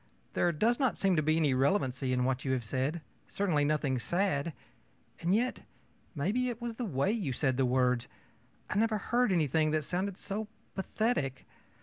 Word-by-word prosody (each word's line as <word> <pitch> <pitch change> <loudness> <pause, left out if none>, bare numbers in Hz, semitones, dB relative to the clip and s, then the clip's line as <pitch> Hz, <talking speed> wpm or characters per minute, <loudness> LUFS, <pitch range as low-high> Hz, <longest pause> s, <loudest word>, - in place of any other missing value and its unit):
There 175 - +2
does 225 +10 +2
not 265 -4 +1
seem 195 -2 +2
to 155 - +3
be 155 +1 +2
any 150 -4 +3
relevancy 130 -2 +1
in 125 0 +1
what 130 0 0
you 130 - 0
have 125 -3 -1
said, 135 +8 -1 0.3
certainly 175 -7 +1
nothing 145 -3 +1
sad; 170 0 0 0.7
and 175 +4 +2
yet 245 +3 0 0.6
maybe 210 - 0
it 235 -2 -5
was 235 -1 -4
the 240 +2 -4
way 170 0 +1
you 205 - -1
said 130 -1 +1
the 130 0 +2
words 125 -1 +2 0.6
I 210 - 0
never 220 -1 +2
heard 240 +2 +1
anything 155 -2 +2
that 155 -1 0
sounded 185 +3 -2
so 210 +2 -4 0.3
pathetic. 190 - -1
160 Hz, 180 wpm, -31 LUFS, 135-205 Hz, 0.7 s, to